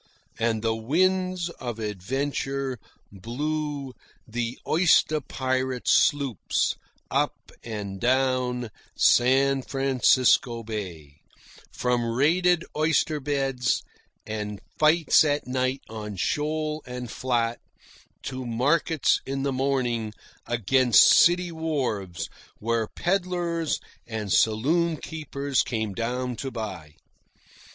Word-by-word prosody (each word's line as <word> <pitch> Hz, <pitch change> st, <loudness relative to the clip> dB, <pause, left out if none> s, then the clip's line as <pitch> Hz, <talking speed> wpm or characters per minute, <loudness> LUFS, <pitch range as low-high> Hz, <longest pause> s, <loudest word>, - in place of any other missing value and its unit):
And 115 Hz, -1 st, 0 dB
the 115 Hz, -1 st, +2 dB
winds 185 Hz, +8 st, +1 dB
of 120 Hz, -3 st, -4 dB
adventure 130 Hz, +5 st, -3 dB, 0.3 s
blew 140 Hz, +6 st, -4 dB, 0.3 s
the 120 Hz, +1 st, -3 dB
oyster 155 Hz, -2 st, +3 dB
pirate 130 Hz, -1 st, -2 dB
sloops 140 Hz, -, +2 dB, 0.4 s
up -, -, -1 dB
and 100 Hz, -4 st, -5 dB
down 125 Hz, -2 st, +1 dB, 0.3 s
San 135 Hz, +2 st, +4 dB
Francisco 130 Hz, -3 st, +2 dB
Bay, 90 Hz, -10 st, -6 dB, 0.5 s
from 125 Hz, -1 st, 0 dB
raided 170 Hz, +7 st, +3 dB
oyster 155 Hz, 0 st, +1 dB
beds 135 Hz, -3 st, 0 dB, 0.4 s
and 105 Hz, -2 st, -4 dB, 0.2 s
fights 155 Hz, +1 st, +5 dB
at 145 Hz, -1 st, 0 dB
night 130 Hz, +1 st, -1 dB
on 105 Hz, -2 st, -6 dB
shoal 155 Hz, +8 st, -1 dB
and 125 Hz, -2 st, -6 dB
flat, 120 Hz, -2 st, -1 dB, 0.6 s
to 130 Hz, -1 st, -5 dB
markets 135 Hz, +6 st, +1 dB
in 135 Hz, 0 st, -2 dB
the 140 Hz, -1 st, 0 dB
morning 125 Hz, -5 st, -1 dB, 0.3 s
against 120 Hz, +2 st, +4 dB
city 175 Hz, 0 st, +5 dB
wharves, 125 Hz, -, -2 dB, 0.3 s
where 115 Hz, 0 st, -1 dB
peddlers 175 Hz, -, -1 dB, 0.3 s
and 110 Hz, -4 st, -4 dB
saloon 155 Hz, +10 st, +2 dB
keepers 140 Hz, -4 st, -2 dB
came 110 Hz, -4 st, -2 dB
down 125 Hz, +3 st, -2 dB
to 135 Hz, -, -4 dB
buy. 105 Hz, -, -6 dB
130 Hz, 95 wpm, -26 LUFS, 115-150 Hz, 0.6 s, fights